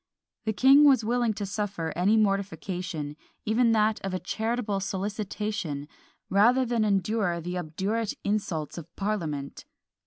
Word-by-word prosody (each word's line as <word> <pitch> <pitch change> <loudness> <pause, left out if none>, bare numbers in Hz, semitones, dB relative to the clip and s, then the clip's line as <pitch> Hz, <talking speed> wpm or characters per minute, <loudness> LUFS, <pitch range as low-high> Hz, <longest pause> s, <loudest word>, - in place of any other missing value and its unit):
The 220 - 0
king 270 +6 +7
was 270 -6 +6
willing 235 -1 +1
to 205 - -3
suffer 200 -5 -3
any 195 +6 +3
mortification, 185 -7 -1 0.3
even 230 +2 +3
that 215 0 +2
of 195 -1 -2
a - - -2
charitable 220 -2 -2
solicitation, 195 -5 -3 0.4
rather 240 +7 +4
than 235 -2 +1
endure 200 -2 +1
the 180 +2 -4
obdurate 195 +7 -2
insults 175 -7 -2
of 160 - -10
parliament! 165 -9 -3
205 Hz, 130 wpm, -27 LUFS, 180-220 Hz, 0.4 s, king